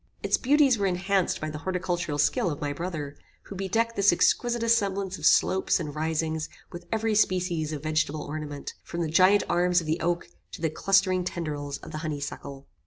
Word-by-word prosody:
Its - - +3
beauties 275 -3 +3
were 200 - +2
enhanced 190 +1 0
by 155 - -3
the 150 - -6
horticultural 175 -3 -2
skill 145 +4 +2
of 145 - -4
my 145 -1 -2
brother, 150 -3 -5 0.3
who 200 - -9
bedecked 225 +5 -1
this 200 0 +5
exquisite 235 +6 +2
assemblage 200 -4 +1
of - - +3
slopes 190 0 +3
and 150 -4 -5
risings 160 +1 -2 0.2
with 175 0 -9
every 220 0 0
species 180 -6 +1
of 150 -2 -5
vegetable 155 -1 0
ornament, 145 -1 -6
from 170 - -5
the 165 - 0
giant 185 +5 +5
arms 180 0 +3
of 165 - -6
the 155 +2 -1
oak 170 +1 -1 0.3
to - - -7
the 160 -1 -1
clustering 185 +1 +2
tendrils 150 -5 -4
of - - -9
the 155 - -5
honey 155 -2 -3
suckle. 140 -1 -7
175 Hz, 190 wpm, -27 LUFS, 155-195 Hz, 0.3 s, this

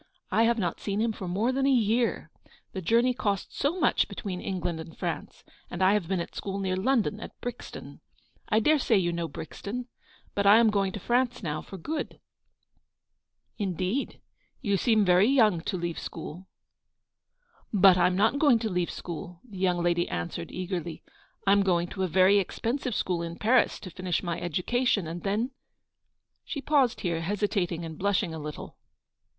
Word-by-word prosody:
1 225 - +3
have 235 +1 +2
not 180 -6 -1
seen 200 0 -2
him 225 +1 +1
for 195 -3 -6
more 205 +8 +1
than 270 +1 +1
a - - +4
year. 235 -1 +1 0.4
The 190 - -4
journey 235 +8 +3
costs 200 -5 -2
so 315 +6 0
much - - +3
between 185 -4 -5
England 175 -3 -3
and 160 0 -9
France, - - -5 0.3
and 175 +2 -2
I 190 +2 +5
have 205 -5 0
been 190 0 0
at 170 - -5
school 195 -1 -4
near 190 -2 -1
London, 215 +1 +1
at - - -10
Brixton; 245 -1 -8 0.5
I 220 -1 +3
dare 305 +6 +4
say 230 -4 +3
you 175 -2 +1
know 170 -1 -2
Brixton; 225 - -6 0.4
but 200 0 +1
I 205 +2 +9
am 230 -2 +5
going 195 -2 +1
to - - -5
France 245 +2 0
now, 155 -2 -2
for 195 - -10
good." 300 - -4 0.7
" - - -52
Indeed! 185 +8 -2 0.4
You 200 -6 0
seem 215 0 +3
very 180 +3 +5
young 220 -10 +4
to 190 - -1
leave 170 -1 -3
school." 180 +5 -7 0.6
" - - -38
But 195 -3 +7
I'm 180 0 +3
not 220 +8 +2
going 280 -6 +5
to 225 -1 -2
leave 180 -1 0
school/' 170 0 -7
the 200 -5 -9
young 180 -2 +1
lady 175 0 +1
answered, 85 0 -4
eagerly. 180 -2 -4 0.2
" - - -35
I 195 - +4
am 200 0 +5
going 175 -3 +2
to 190 - -5
a 185 - +2
very 190 +3 +5
expensive 235 +5 -2
school 175 -2 -1
in 170 0 -5
Paris, 240 +6 +2
to 185 - -8
finish 185 +1 -2
my 170 -2 -3
education; 195 - 0
and 165 +2 -5
then 215 +6 -1 0.3
— - - -54
" - - -52
She 290 - -5
paused 275 -4 +2
here, 170 -3 -1
hesitating 185 -2 -1
and 160 -1 -8
blushing 200 -3 +1
a 160 - -5
little. 150 0 -7
195 Hz, 190 wpm, -28 LUFS, 175-230 Hz, 0.7 s, I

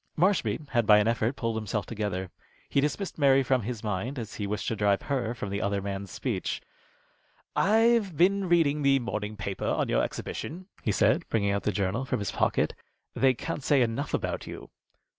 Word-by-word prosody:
Marshby 175 -3 +1
had 120 -4 +2
by 105 - +8
an 105 +1 +3
effort 115 +2 +1
pulled 115 -1 -2
himself 105 -2 -2
together. 100 -4 -3 0.4
He 140 - +2
dismissed 160 +5 -2
Mary 135 -1 +5
from 130 0 +2
his 115 +1 -5
mind, 110 +6 -2
as 115 -3 -5
he 105 - -3
wished 105 -1 -3
to 115 - -1
drive 100 -2 +2
her 125 -4 -1
from 100 -4 -5
the 100 - -2
other 100 0 0
man's 100 0 -4
speech. - - -3 1.0
"I've 220 -4 +3
been 190 +1 +3
reading 155 -4 +3
the 140 -1 +4
morning 105 -4 -4
paper 100 -1 -3
on - - 0
your - - +3
exhibition," 175 +5 -5 0.2
he 105 - 0
said, - - +2
bringing 100 -3 +1
out 100 0 0
the 105 - 0
journal 100 +5 -1
from 130 - -1
his 100 - -3
pocket. - - +1 0.4
"They 130 -1 +3
can't 155 +5 -4
say 135 -1 +4
enough 120 +5 -1
about - - -3
you." - - -9
115 Hz, 195 wpm, -28 LUFS, 105-145 Hz, 1.0 s, by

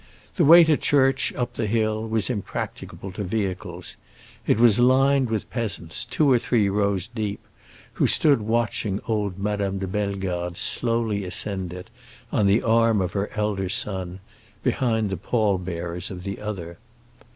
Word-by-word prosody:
The 170 - +3
way 170 +3 +9
to 160 -2 +3
church, 135 -2 +2
up 125 - -3
the 110 - -2
hill, 110 0 0
was 110 -2 0
impracticable 100 -2 -5
to 95 +3 -5
vehicles. 90 -3 -4 0.5
It - - +3
was 115 -1 +5
lined 130 +1 +4
with 110 -1 -3
peasants, 100 -9 -3
two 150 -3 +2
or 125 - +5
three 110 -4 +1
rows 100 -2 0
deep, 110 -3 -4 0.5
who - - +2
stood 145 -7 +4
watching 110 -2 -1
old 105 -4 -1
Madame 100 -1 -2
de 95 - -3
Bellegarde 95 -3 -3
slowly 115 -4 0
ascend 95 0 -2
it, 90 +5 -9 0.4
on 105 -4 +2
the 100 +3 +3
arm 115 -2 +3
of 90 -1 -2
her 100 0 -2
elder 105 -3 -1
son, 95 -4 -1 0.4
behind 115 -5 0
the 95 - -2
pall 105 0 0
bearers 85 -1 -5
of 90 -2 -8
the 100 +1 -5
other. 90 -5 -6
105 Hz, 155 wpm, -24 LUFS, 95-115 Hz, 0.5 s, way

